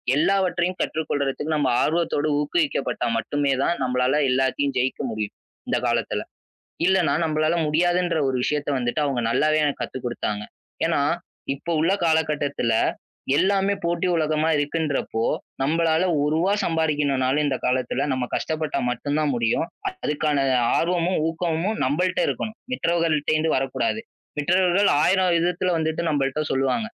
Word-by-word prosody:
எல்லாவற்றையும் 180 +2 +1
கற்றுக் 160 -1 -2
கொள்றதுக்கு, 145 +2 -1
நம்ம 145 -4 +1
ஆர்வத்தோட 155 -2 0
ஊக்குவிக்கப்பட்டா 150 -5 -1
மட்டுமே 140 +5 0
தான் 170 - +1
நம்மளால 125 +3 +1
எல்லாத்தையும் 135 +2 0
ஜெயிக்க 130 +1 0
முடியும் 110 -2 -4 0.3
இந்தக் - - 0
காலத்துல. - - 0 0.7
இல்லன்னா 185 -6 +3
நம்பளால 155 +1 +1
முடியாதுன்ற 175 +2 +1
ஒரு 130 - 0
விஷயத்த 150 -1 -1
வந்துட்டு 125 +4 -1
அவங்க 135 -4 0
நல்லாவே 155 +5 +2
எனக்குக் 145 -2 -1
கத்துக் 130 - -6
குடுத்தாங்க. 105 -3 -3 0.4
ஏன்னா, - - +1 0.5
இப்போ 140 +5 -7
உள்ள 165 +4 +2
காலகட்டத்துல 150 -6 +1 0.6
எல்லாமே 195 +3 +2
போட்டி 170 +1 0
உலகமா 155 0 +1
இருக்குன்றப்போ, 145 -5 -1 0.4
நம்பளால 160 +3 +2 0.2
1 145 - +1
ரூபா 180 +5 +2
சம்பாதிக்கணும்னாலும் 150 -4 +1
இந்த 135 -2 0
காலத்துல 130 +1 0
நம்ம 130 -1 -1
கஷ்டப்பட்டா 155 -1 -2
மட்டும்தான் 145 +4 -1
முடியும். 115 +5 +1 0.3
அதுக்கான 150 - -1 0.4
ஆர்வமும், 175 +1 +1
ஊக்கமும் 170 +5 -1
நம்பள்ட்ட 180 +7 0
இருக்கணும். 220 0 -4
மற்றவர்கள்கிட்டருந்து 160 -6 +1
வரக் 130 0 -1
கூடாது. 220 - 0 0.4
மற்றவர்கள் 180 +5 +3
ஆயிரம் 185 +1 +3
விதத்துல 175 +2 0
வந்துட்டு 160 0 -1
நம்பள்ட்ட 140 0 0
சொல்லுவாங்க. 135 - 0
155 Hz, 125 wpm, -23 LUFS, 140-170 Hz, 0.7 s, இல்லன்னா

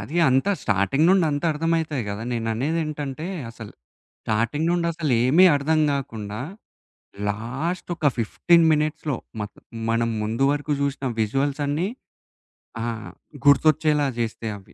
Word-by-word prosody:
అది 160 - -6
అంతా 135 +9 +2
స్టార్టింగ్ 100 - +2
నుండి 190 -3 +4
అంతా 145 +3 -1
అర్థం 165 +2 -1
అయితది 150 -5 -2
గదా! 100 +2 -4
నేను 115 -1 -2
అనేదేంటంటే, 150 +2 -2 0.2
అసలు 115 -2 -10 0.5
స్టార్టింగ్ 115 +9 0
నుండి 175 -1 +1
అసలు 155 -5 -1
ఏమి 160 +9 +6
అర్థం 155 +3 +1
కాకుండా 110 -6 -4 0.9
లాస్ట్ 125 - -3
ఒక 160 - -1
15 165 +9 +3
మినిట్స్‌లో 150 -2 -1 0.2
మత్ 105 0 -6 0.3
మనం 115 0 +1
ముందు 115 +5 0
వరకు 145 +1 -2
జూశిన 140 -1 -1
విజువల్స్ 135 +6 0
అన్నీ 155 +6 0 1.0
ఆహ్, 115 -2 -4 0.3
గుర్తొచ్చేలా 150 0 +4
జేస్తే 115 -1 -3
అవి. 95 - -18
140 Hz, 130 wpm, -24 LUFS, 115-155 Hz, 1.0 s, ఏమి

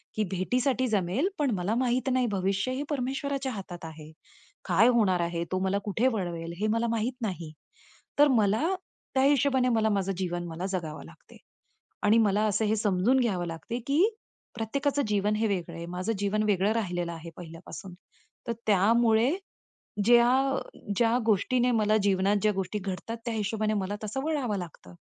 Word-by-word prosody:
की 215 - +1
भेटीसाठी 250 +7 0
जमेल, 205 - +1
पण 285 -4 +2
मला 190 +4 -1
माहित 255 +1 +1
नाही 255 -1 +2
भविष्य 195 +4 0
हे 275 +3 -2
परमेश्वराच्या 275 0 -2
हातात 180 -5 -7
आहे. 155 -1 -10 0.5
काय 190 +6 +4
होणार 210 -7 +3
आहे? 170 0 -1
तो 185 - 0
मला 190 +1 +1
कुठे 215 +5 +1
वळवेल? 170 -4 -4
हे 215 - +1
मला 235 +1 +1
माहीत 230 +2 -1
नाही. 175 -7 -4 0.7
तर 290 - +8
मला 210 +5 +2 0.5
त्या 265 - +4
हिशोबाने 275 -2 +3
मला 220 0 +2
माझं 195 -2 0
जीवन 175 -1 -3
जगावं 165 - -4
लागते. 80 - -16 0.7
आणि 210 +2 +5
मला 210 -1 +3
असं 215 +2 +1
हे 215 +1 +2
समजून 210 +5 +2
घ्यावं 185 -7 0
लागते 165 +9 -5
की 285 +4 +3 0.5
प्रत्येकाचं 280 +6 -1
जीवन 210 0 +1
हे 220 +1 +1
वेगळं 175 -4 -3
आहे. 170 - -6
माझं 185 +5 -2
जीवन 205 +1 0
वेगळं 205 0 +2
राहिलेलं 175 -6 -2
आहे 165 0 -8
पहिल्यापासून. 175 +2 -9 0.5
तर 235 - 0
त्यामुळे, 220 +4 +4 0.8
ज्या 240 +1 +6 0.2
अ, 265 - 0 0.4
ज्या 235 0 +3
गोष्टीने 245 +4 +2
मला 215 0 +3
जीवनात 195 +1 +2
ज्या 215 - +3
गोष्टी 195 +1 -3
घडतात. 200 +3 -5
त्या 235 - -1
हिशोबाने 215 0 -1
मला 205 +2 -3
तसं 240 +6 -3
वळावं 265 -10 -1
लागतं. 160 - -9
210 Hz, 165 wpm, -28 LUFS, 185-240 Hz, 0.8 s, तर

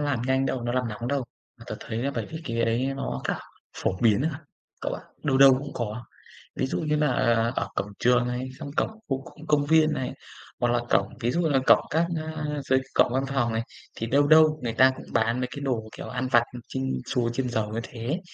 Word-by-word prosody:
làm 145 -5 0
nhanh 130 0 +2
đâu, 130 - -2
nó 120 0 -1
làm 125 -1 0
nóng 115 +3 -5
đâu, 140 -2 0 0.3
mà - - -13
tớ - - -4
thấy 110 - -4
là 140 - 0
bởi - - -2
vì 160 0 -6
cái 115 -3 -2
ấy 120 +4 0
nó 65 - -3
cả - - -1 0.4
phổ 95 - -1
biến 110 +1 +4
à 155 0 -3 0.4
cậu - - -2
ạ, - - -8 0.2
đâu 135 -2 +2
đâu 135 -1 +9
cũng 140 +1 -7
có. 120 0 -4 0.5
Ví - - 0
dụ - - -2
như 150 -1 +1
là 150 -2 +2 0.4
ở - - -1
cổng 105 - -2
trường 125 0 +3
này, 125 +1 -3
trong 140 - -6
cổng - - +2 0.2
khu 135 -1 -1
công 155 - -13
công 145 -1 +3
viên 155 0 +4
này, 130 - -3 0.5
hoặc 120 - +2
là 120 - +2
cổng, - - +3
ví 120 +1 0
dụ 175 - +1
như 165 - +2
là 135 - +3
cổng - - +6
các, 165 +2 +2
a, 155 -1 -4 0.2
dưới 130 0 +5 0.2
cổng 120 - +4
văn 130 - +1
phòng 130 -4 0
này, 115 +1 0 0.3
thì 115 - -3
đâu 145 +4 +3
đâu 155 0 +6
người 115 - -1
ta 130 +3 +6
cũng - - -10
bán 115 +2 +2
mấy 125 - -1
cái 140 - -6
đồ, 120 -6 -2
kiểu, - - -6
ăn 125 +1 -2
vặt 120 -1 +6 0.2
chiên 130 - -3 0.2
xù, 125 -3 0
chiên 125 +1 -2
dầu 110 -3 -1
như 110 +2 -3
thế, 120 +8 -4
130 Hz, 245 wpm, -26 LUFS, 120-145 Hz, 0.5 s, đâu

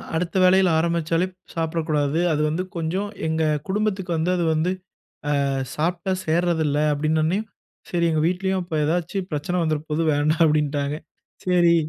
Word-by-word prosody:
அடுத்த 170 +2 -2
வேளையில 185 0 +5
ஆரம்பிச்சாலே 170 +1 +1 0.3
சாப்பிடக்கூடாது. 160 -2 0
அது 150 - 0
வந்து 175 +4 -1
கொஞ்சம், 185 +5 -2 0.2
எங்க 160 0 0 0.3
குடும்பத்துக்கு 195 -3 -1
வந்து 170 +3 +1
அது 175 - 0
வந்து, 160 +4 +1 0.7
அ - - 0 0.3
சாப்பிட்டா 175 +4 -1
சேர்றதுல்ல 160 -3 +1
அப்டினவுடனே 155 +5 +1 0.5
செரி 170 -1 +1
எங்க 155 -1 +1
வீட்லயும் 190 +1 0
இப்ப 170 -2 -5
ஏதாச்சு 175 +4 -1
பிரச்சனை 150 +5 -2
வந்துர 155 -2 0
போது 155 +2 0
வேண்டாம் 155 +3 +2
அப்படின்ட்டாங்க. 145 -1 0 0.5
செரி. 175 -2 +4
165 Hz, 135 wpm, -23 LUFS, 155-180 Hz, 0.7 s, வேளையில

